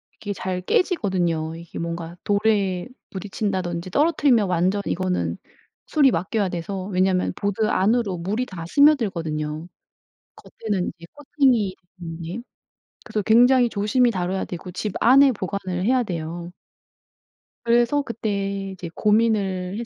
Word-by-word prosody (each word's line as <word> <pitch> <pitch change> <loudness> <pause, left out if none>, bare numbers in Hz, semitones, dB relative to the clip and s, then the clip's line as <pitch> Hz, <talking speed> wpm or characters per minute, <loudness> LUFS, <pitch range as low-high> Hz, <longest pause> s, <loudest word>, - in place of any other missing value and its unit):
이게 205 -1 -5
잘 185 -1 -3
깨지거든요. 180 - 0
이게 170 0 -9
뭔가 170 0 -5
돌에 200 -3 +1 0.2
부딪친다든지 185 -3 -3
떨어뜨리면 285 - +3
완전 185 +3 +1
이거는 185 0 -1 0.5
수리 285 -4 +4
맡겨야 195 +3 -1
돼서 185 +2 -4
왜냐면 185 -1 +1
보드 205 +1 -1
안으로 210 -1 +1
물이 205 +9 -2
다 185 -8 -8
스며들거든요. 170 - +2 0.7
겉에는 205 -5 -3
이제 170 - -12
코팅이 265 -9 +1 0.3
음 165 -1 -6
예. 180 +7 -5 0.7
그래서 215 -2 -2
굉장히 245 +4 +5
조심히 225 +4 +2
다뤄야 185 -2 -2
되고 180 +1 -7
집 190 +3 -4
안에 270 +3 +6
보관을 185 -3 -3
해야 255 +3 +3
돼요. 170 -3 -5 1.1
그래서 240 +4 +3
그때 200 -5 -3
이제 180 -2 -7
고민을 205 -3 +1
했 235 - -4
195 Hz, 300 characters per minute, -23 LUFS, 180-230 Hz, 1.1 s, 안에